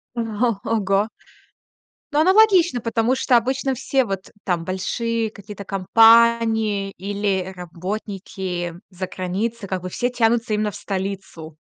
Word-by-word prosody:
О, 235 - -1 0.4
ого. 205 -1 +1 1.0
Ну, 295 - +3
аналогично, 370 - +5
потому 230 +2 +1
что 255 -1 +3
обычно 265 +3 0
все 265 +1 +1
вот, 195 -4 -5
там, 170 -3 -1
большие 225 +5 -2
какие-то 205 -1 -10
компании, 225 0 +4
или 195 -1 -2
работники 180 0 -5 0.2
заграницы, 190 +4 -4
как 185 -2 -3
бы 185 - -5
все 245 +6 -1
тянутся 230 -2 +1
именно 210 0 0
в - - -11
столицу. 190 -5 -5
210 Hz, 120 wpm, -22 LUFS, 190-235 Hz, 1.0 s, аналогично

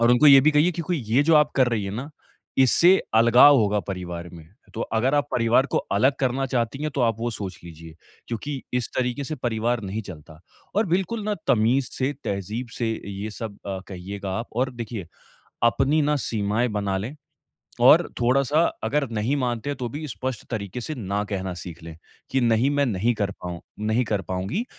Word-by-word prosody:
और 115 +1 +4
उनको 125 +5 +5
ये 135 -1 +9
भी 155 - +5
कहिए 155 +5 +3
कि 170 - -4
कोई 175 +2 -1
ये 125 +6 +3
जो 160 - +6
आप 150 0 +3
कर 130 -2 +4
रही 110 -4 -1
है 95 - -3
ना 135 +4 -5 0.5
इससे 170 +9 +6 0.2
अलगाव 120 +5 +7
होगा 105 -1 +2
परिवार 90 -2 -5
में। 80 -2 -12 0.3
तो 115 - -5 0.2
अगर 130 +5 +2
आप 145 0 0
परिवार 120 +3 +3
को - - +4
अलग 130 +7 +3
करना 135 +1 0
चाहती 125 +2 -2
हैं 155 - -1
तो - - +1
आप 115 -2 +2
वो 120 0 -1
सोच 95 -4 -6
लीजिए, 80 -1 -11 0.3
क्योंकि 135 +4 -4
इस 125 -2 0
तरीक़े 125 +3 -1
से 155 - -4
परिवार 120 -1 -1
नहीं 100 +3 -4
चलता 80 -1 -12 0.4
और 215 - +3
बिल्कुल 190 +5 -1
ना 210 -1 0
तमीज़ 125 +3 +3
से 135 +2 -1
तहज़ीब 105 +5 -3
से 115 -2 0 0.2
ये 100 +3 -5
सब 105 -1 -7
अ, 95 -1 -3
कहिएगा 95 +1 -6
आप। 115 - -5
और 130 +1 +1
देखिए, 115 -6 -6 0.6
अपनी 135 +6 +3
ना 150 +1 +2
सीमाएँ 110 +2 0
बना 100 -1 -1
लें, 120 +9 -5 0.7
और - - +6
थोड़ा-सा 135 +5 +3 0.2
अगर 145 -3 0
नहीं 115 +6 0
मानते 125 0 -2
हैं 140 - -3
तो 125 -2 -3
भी 150 +3 -5
स्पष्ट 130 -2 -4
तरीक़े 110 0 -4
से 155 - -4
ना 100 -2 -2
कहना 95 -2 -4
सीख 85 -2 -9
लें। 80 -1 -9 0.3
कि 135 - +1
नहीं 120 +3 +3
मैं 145 0 +2
नहीं 115 +1 +1
कर 100 -2 -1
पाऊँ 90 -1 -5 0.2
नहीं 110 +3 +1
कर 105 -2 -1
पाऊँगी। 95 - -3
120 Hz, 200 wpm, -24 LUFS, 100-135 Hz, 0.7 s, ये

